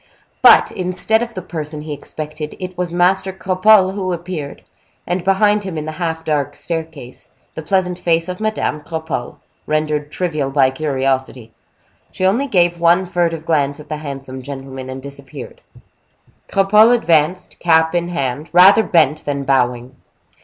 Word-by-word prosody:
But, - - +7
instead 185 +5 0
of 235 -1 -5
the 185 - -5
person 155 -3 -6
he 155 -1 -5
expected, 150 +1 -6
it 185 0 -6
was 180 -1 -3
Master 185 +2 +2
Cropole 190 +1 +3
who 185 -2 -2
appeared, 170 -4 -6 0.4
and 175 0 -2
behind 205 +2 +2
him, 190 -4 -5
in 155 - -4
the 155 - -4
half 160 -1 -3
dark 145 -2 -1
staircase, 160 -6 -6 0.2
the - - -6
pleasant 180 +2 -1
face 165 -1 +1
of 180 0 -5
Madame 215 -8 -2
Cropole, 160 -6 -5 0.3
rendered 150 -1 -1
trivial 155 -7 -2
by 135 -1 +3
curiosity. 130 -4 -2 0.6
She 185 - -2
only 235 +9 +2
gave 175 -6 +2
one 170 +3 +3
furtive 170 -3 -1
glance 145 -3 0
at 150 - -13
the 155 - -3
handsome 135 -3 -7
gentleman, 135 -1 -8
and 130 0 -7
disappeared. 140 -1 -9 0.9
Cropole 210 +4 +5
advanced, 170 -4 0
cap 160 -1 +3
in 175 -1 0
hand, 150 -2 -3
rather 190 +5 +7
bent 155 -7 +2
than 140 -1 -2
bowing. 125 -1 0
160 Hz, 155 wpm, -18 LUFS, 145-185 Hz, 0.9 s, But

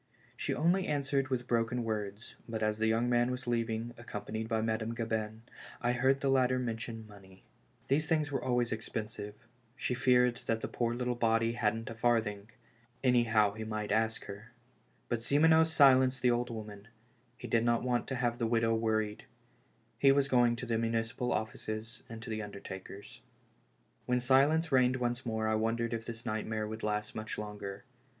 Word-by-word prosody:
She - - -2
only 180 +4 +2
answered 140 -2 0
with 130 -2 -2
broken 120 0 0
words, 105 -1 -4
but 110 -1 -2
as 105 0 0
the 110 - +2
young 115 +2 +2
man 120 0 +3
was 125 +1 -4
leaving, 115 -1 -1
accompanied 110 -1 -5
by 115 -1 +1
Madame 110 +1 -1
Gabin, 110 -1 -3 0.4
I 120 - +1
heard 130 +3 +2
the 140 - +1
latter 130 -1 +3
mention 115 -2 -4
money. 95 -3 -16 0.4
These 150 +4 +1
things 155 -2 +1
were 135 - -2
always 125 -2 +1
expensive 110 -1 -5 0.2
— - - -37
she 130 - -2
feared 125 -1 +3
that 115 -1 0
the - - -2
poor 120 -1 -1
little 125 0 -1
body 115 -1 +2
hadn't 115 0 -1
a - - -4
farthing 110 -3 0 0.3
— 120 +2 -35
anyhow 115 -5 +4
he 110 +1 -6
might 110 -1 -3
ask 110 +1 +1
her. 110 +4 -10 0.5
But 120 - -1
Simoneau 160 +6 +5
silenced 135 -5 +5
the 125 - +5
old 120 +1 0
woman; 105 -2 -8 0.5
he - - -7
did 115 -1 +2
not 120 0 +2
want 125 -1 0
to 130 - -2
have 120 -1 -1
the 115 - +1
widow 115 0 +2
worried; 110 -2 -1 0.7
he 135 - +6
was 140 0 +3
going 120 -3 +4
to 120 - -6
the 115 -2 0
municipal 115 +1 -1
offices 110 +1 -4
and 115 -1 -8
to - - -8
the 110 0 -2
undertakers. 100 -1 -9 0.9
AVhen 125 0 +3
silence 140 +6 +3
reigned 130 -1 +4
once 120 0 -2
more 110 -1 -1
I 110 - +2
wondered 115 +2 0
if 115 0 -4
this 115 0 -7
nightmare 110 -1 -2
would 110 +1 -6
last 105 0 -2
much 110 0 -5
longer. 105 -2 -6
115 Hz, 180 wpm, -32 LUFS, 110-125 Hz, 0.9 s, he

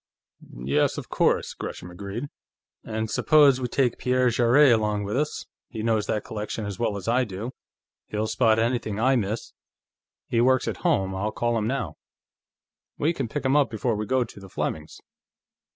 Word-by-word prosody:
"Yes, 70 - +2
of - - -6
course," - - +1
Gresham 90 - -7
agreed. 100 +8 -5 0.6
"And 110 0 -3
suppose 140 +1 +4
we 125 - -1
take 125 -1 0
Pierre 125 -1 +2
Jarrett 120 +4 +5
along 105 -2 0
with 100 +3 -3
us. 150 +3 -1 0.2
He 110 -2 -5
knows 110 -2 +1
that 105 - -1
collection 105 0 -5
as 100 +1 -6
well 110 -3 0
as 95 - -8
I 125 +3 +3
do; 110 +2 -5 0.6
he'll 105 +1 -2
spot 110 0 +3
anything 115 -2 0
I 130 +3 +3
miss. 110 -1 -2 0.7
He 115 - +1
works 130 0 +3
at 110 -5 -2
home; 95 0 +1
I'll 100 +3 -2
call 120 +1 0
him 110 -1 0
now. 135 +3 -3 1.0
We 160 +4 +1
can 135 -6 -3
pick 145 +4 -4
him 130 +2 +3
up 145 -2 +4
before 115 +1 -1
we 105 0 -3
go 130 -1 +2
to 115 -3 -12
the 95 -1 -12
Flemings'." 80 -3 -4
115 Hz, 180 wpm, -25 LUFS, 105-130 Hz, 1.0 s, Jarrett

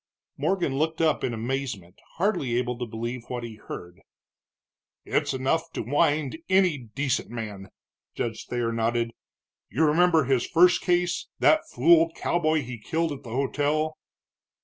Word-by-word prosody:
Morgan 155 -3 0
looked 160 +1 0
up 160 -2 +2
in 125 - 0
amazement, 115 -6 -4 0.2
hardly 170 - 0
able 125 0 0
to 120 - -3
believe 115 +3 -4
what 125 -1 -4
he 115 -2 -7
heard. 90 -2 -9 1.0
"It's - - 0
enough 160 +6 0
to - - -3
wind 145 +3 +1
any 185 -6 +3 0.2
decent 135 -2 0
man," 105 -5 -6 0.5
Judge 115 -2 -4
Thayer 120 -1 -1
nodded. 115 +1 0 0.6
"You 160 - +2
remember 165 +1 +4
his 130 -2 +1
first 175 +2 +5
case 175 -1 +1
that 315 0 +3
fool 165 +5 +5
cowboy 160 -3 +1
he 125 -1 -7
killed 160 +8 -1
at 140 - -6
the 120 - -11
hotel?" 145 +5 0
140 Hz, 145 wpm, -26 LUFS, 120-160 Hz, 1.0 s, first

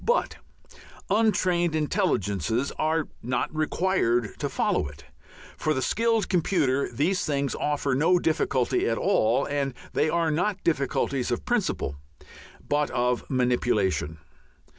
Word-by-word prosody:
But 480 - +1 0.7
untrained 185 -6 +2
intelligences 130 - 0
are 155 0 +1
not 125 +5 -2
required 155 - +1
to - - -2
follow - - 0
it. 70 -1 -12 0.5
For 155 -1 0
the 130 - -1
skilled 230 -1 +1
computer 155 -7 +1
these 160 +10 0
things 140 -2 -1
offer 145 -2 -1
no 165 +7 +3
difficulty 135 -8 +1
at 115 - 0
all. 120 +5 +2
And 140 -2 -2 0.2
they 155 - +2
are 165 -1 +1
not 185 +5 -1
difficulties 140 -4 0
of 120 - -2
principle 195 - -1 0.7
but 145 0 +1
of 125 0 -1
manipulation. 120 - +1
145 Hz, 120 wpm, -26 LUFS, 125-175 Hz, 0.7 s, no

